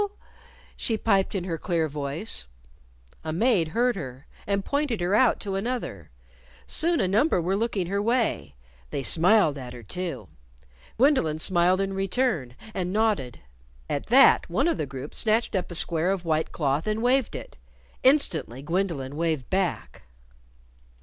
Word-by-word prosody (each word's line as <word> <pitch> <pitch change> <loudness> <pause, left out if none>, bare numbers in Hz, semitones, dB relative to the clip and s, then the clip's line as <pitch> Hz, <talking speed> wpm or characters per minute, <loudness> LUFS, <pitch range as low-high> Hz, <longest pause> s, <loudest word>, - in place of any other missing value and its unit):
she 225 - -1
piped 200 -2 +1
in 190 - -1
her 170 -3 -4
clear 165 -2 0
voice. 145 - -4 0.8
A 160 - -3
maid 185 -1 +2
heard 240 +9 +1
her, 130 -6 -7 0.2
and 200 -1 0
pointed 280 -5 -1
her 175 +2 0
out 235 +3 +4
to 195 - -4
another. 195 - -4 0.6
Soon 335 0 +1
a 190 - +2
number 215 - +2
were 180 +3 0
looking 210 -3 -1
her 200 +3 -1
way. 230 - 0 0.3
They 140 - -3
smiled 170 -2 +4
at 125 -2 -8
her, 120 -1 -10
too, 135 - -5 0.7
Gwendolyn 250 - +3
smiled 180 +2 +3
in 195 0 -2
return, 195 - -1 0.2
and 180 -1 -2
nodded. 205 - 0 0.5
At 140 - -3
that, 265 +4 +6
one - - +1
of 335 - 0
a 145 - -2
group 135 +1 -8
snatched 220 0 +1
up 185 - -1
a 175 - -7
square 165 +1 0
of 190 -2 -1
white 160 -1 0
cloth 145 +3 -1
and 215 +1 -1
waved 255 +1 +2
it. - - -9 0.4
Instantly 175 - +2
Gwendolyn 165 -5 -2
waved 160 -4 -2
back. 190 -3 -2
185 Hz, 155 wpm, -26 LUFS, 155-220 Hz, 0.8 s, that